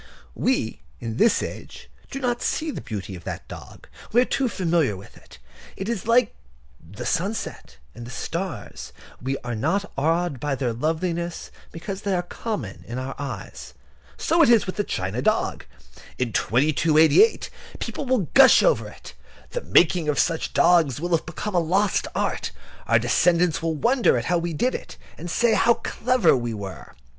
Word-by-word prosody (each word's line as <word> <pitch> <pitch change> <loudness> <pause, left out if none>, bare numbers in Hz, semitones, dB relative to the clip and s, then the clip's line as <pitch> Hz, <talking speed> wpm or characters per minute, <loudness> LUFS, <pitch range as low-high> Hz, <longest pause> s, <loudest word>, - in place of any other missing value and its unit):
We, 115 - -1 0.2
in 115 -1 -5
this 225 +7 +3
age, - - -8 0.2
do 270 - -5
not 245 -2 -1
see 315 0 -1
the - - -6
beauty 100 -3 -6
of 90 - -11
that - - -6
dog. - - -11 0.2
We 240 - +4
are - - +2
too 265 -1 0
familiar 165 - 0
with 95 - -14
it. - - -16 0.4
It 190 - -4
is 225 -4 -3
like 235 -1 +4 0.5
the 90 +6 -9
sunset 180 - -3 0.2
and 120 0 -9
the - - -9
stars: 165 +5 -5 0.3
we 135 +2 -2
are 120 0 -4
not 165 - -1
awed 160 0 0
by 145 0 -1
their 125 -3 -1
loveliness 165 +6 -2 0.2
because 190 +4 -6
they 200 -2 0
are 175 - 0
common 215 +4 -5
to 120 - -7
our 130 +1 -4
eyes. 140 -1 -7 0.4
So 335 +1 +2
it 300 - +6
is 230 -3 +5
with 185 - -5
that 205 - -1
china 95 +6 -2
dog. - - 0 0.5
In 125 -4 -2
2288 155 - +3 0.3
people 285 - -5
will 245 -9 +1
gush 270 -1 +7
over - - +2
it. - - -12 0.4
The - - -3
making 170 - +3
of 145 - 0
such 165 -2 0
dogs 165 -7 +4
will 175 +3 -3
have 160 - -3
become 195 +5 -5
a 175 - +3
lost 190 +4 +1
art. - - -1 0.4
Our 115 - +5
descendants 165 +9 +2
will 165 -1 -1
wonder 235 - +3
how 175 +8 0
we 170 0 -3
did 250 - 0
it, - - -7 0.2
and 175 +3 -7
say 235 +5 +2
how 235 0 +4
clever 250 - +2
we 120 -3 -3
were. 100 -2 -8
170 Hz, 175 wpm, -24 LUFS, 130-210 Hz, 0.5 s, gush